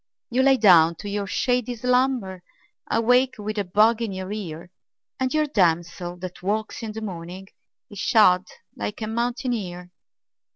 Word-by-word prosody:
You 250 Hz, +2 st, +2 dB
lie 270 Hz, 0 st, +5 dB
down 170 Hz, -8 st, +6 dB
to 205 Hz, -, -9 dB
your 200 Hz, 0 st, -3 dB
shady 245 Hz, +2 st, 0 dB
slumber 250 Hz, -6 st, 0 dB, 0.5 s
And 225 Hz, 0 st, 0 dB
wake 250 Hz, +2 st, +3 dB
with 215 Hz, 0 st, -4 dB
a -, -, +1 dB
bug 215 Hz, +5 st, +3 dB
in 225 Hz, -3 st, -2 dB
your 190 Hz, 0 st, -6 dB
ear, 175 Hz, -5 st, -6 dB, 0.5 s
And 260 Hz, 0 st, 0 dB
your 310 Hz, 0 st, +2 dB
damsel 175 Hz, -, 0 dB
that 185 Hz, -1 st, -7 dB
walks 215 Hz, +5 st, -2 dB
in 220 Hz, -2 st, -5 dB
the 220 Hz, -, -6 dB
morning 185 Hz, -1 st, -7 dB, 0.4 s
Is 205 Hz, -, -11 dB
shod 185 Hz, -5 st, +4 dB, 0.3 s
like 205 Hz, -, -5 dB
a -, -, -1 dB
mountaineer. 220 Hz, -6 st, -3 dB
210 Hz, 160 wpm, -24 LUFS, 180-240 Hz, 0.5 s, down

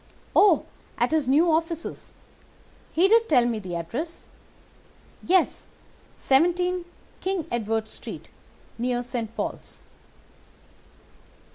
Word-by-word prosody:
"'Oh, 395 Hz, -6 st, +5 dB, 0.3 s
at -, -, +1 dB
his 310 Hz, -5 st, +1 dB
new 320 Hz, +5 st, +4 dB
offices. 330 Hz, +1 st, -2 dB, 0.8 s
He 355 Hz, +4 st, +4 dB
did 455 Hz, +2 st, +4 dB
tell 250 Hz, -6 st, +5 dB
me 235 Hz, -2 st, -1 dB
the 185 Hz, -4 st, -6 dB
address. 255 Hz, -, -5 dB, 1.0 s
Yes, 370 Hz, -1 st, +2 dB, 0.5 s
17 355 Hz, +5 st, +2 dB, 0.3 s
King 375 Hz, -4 st, -2 dB
Edward 225 Hz, -1 st, -1 dB
Street, -, -, -8 dB, 0.5 s
near 245 Hz, 0 st, 0 dB
St. 235 Hz, -2 st, -4 dB
Paul's. -, -, -5 dB
310 Hz, 100 wpm, -25 LUFS, 235-350 Hz, 1.0 s, Oh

